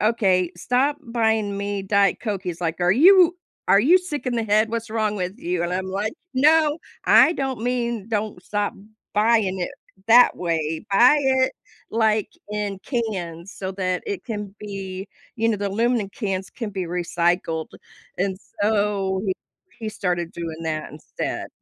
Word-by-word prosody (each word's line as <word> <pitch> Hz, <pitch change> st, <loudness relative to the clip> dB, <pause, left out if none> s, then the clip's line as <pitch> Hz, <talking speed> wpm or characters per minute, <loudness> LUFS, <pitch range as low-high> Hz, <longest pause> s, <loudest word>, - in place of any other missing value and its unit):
"Okay, 190 Hz, -5 st, +2 dB
stop 260 Hz, +9 st, +1 dB
buying 220 Hz, -5 st, 0 dB
me 200 Hz, 0 st, -3 dB
Diet 200 Hz, 0 st, +2 dB
Coke," 205 Hz, -5 st, -3 dB
he's 175 Hz, -1 st, -5 dB
like, 165 Hz, 0 st, -2 dB
"Are 175 Hz, 0 st, +3 dB
you 355 Hz, -, +6 dB, 0.3 s
are 195 Hz, -, +6 dB
you 320 Hz, -, +6 dB
sick 330 Hz, -7 st, -4 dB
in 250 Hz, -, 0 dB
the 230 Hz, -, 0 dB
head? 215 Hz, +1 st, +2 dB
What's 230 Hz, -1 st, -3 dB
wrong 215 Hz, -1 st, 0 dB
with 185 Hz, 0 st, -4 dB
you?" 175 Hz, 0 st, -2 dB
And 175 Hz, +1 st, -2 dB
I'm 185 Hz, +1 st, -2 dB
like, 200 Hz, +5 st, -2 dB, 0.2 s
"No, 305 Hz, +3 st, +4 dB, 0.3 s
I -, -, +7 dB
don't 270 Hz, -7 st, -3 dB
mean 235 Hz, -3 st, -1 dB
don't 210 Hz, -4 st, -2 dB
stop 205 Hz, +1 st, -2 dB, 0.4 s
buying 210 Hz, -3 st, +2 dB
it 175 Hz, -, -2 dB, 0.4 s
that 245 Hz, +2 st, +7 dB
way, 160 Hz, -2 st, -2 dB
buy 245 Hz, +8 st, +6 dB
it 260 Hz, -1 st, +2 dB, 0.4 s
like 220 Hz, -2 st, +2 dB, 0.2 s
in 205 Hz, -2 st, -3 dB
cans 195 Hz, -, -4 dB
so 190 Hz, -1 st, -5 dB
that 185 Hz, -1 st, -2 dB
it 405 Hz, -3 st, -4 dB
can 210 Hz, -4 st, -5 dB
be, 195 Hz, -2 st, -6 dB, 0.3 s
you 225 Hz, 0 st, +1 dB
know, 225 Hz, -, +1 dB
the 200 Hz, 0 st, -2 dB
aluminum 225 Hz, +1 st, +1 dB
cans 195 Hz, -4 st, -4 dB
can 225 Hz, -4 st, -5 dB
be 190 Hz, -2 st, -3 dB
recycled," 170 Hz, -1 st, -1 dB, 0.5 s
and 190 Hz, 0 st, 0 dB, 0.2 s
so 205 Hz, -2 st, +1 dB
he 190 Hz, -, +1 dB, 0.5 s
he 225 Hz, -2 st, -4 dB
started 180 Hz, -5 st, -2 dB
doing 165 Hz, -1 st, -6 dB
that 155 Hz, -1 st, -3 dB
instead. 150 Hz, -, -5 dB
205 Hz, 165 wpm, -23 LUFS, 185-230 Hz, 0.5 s, I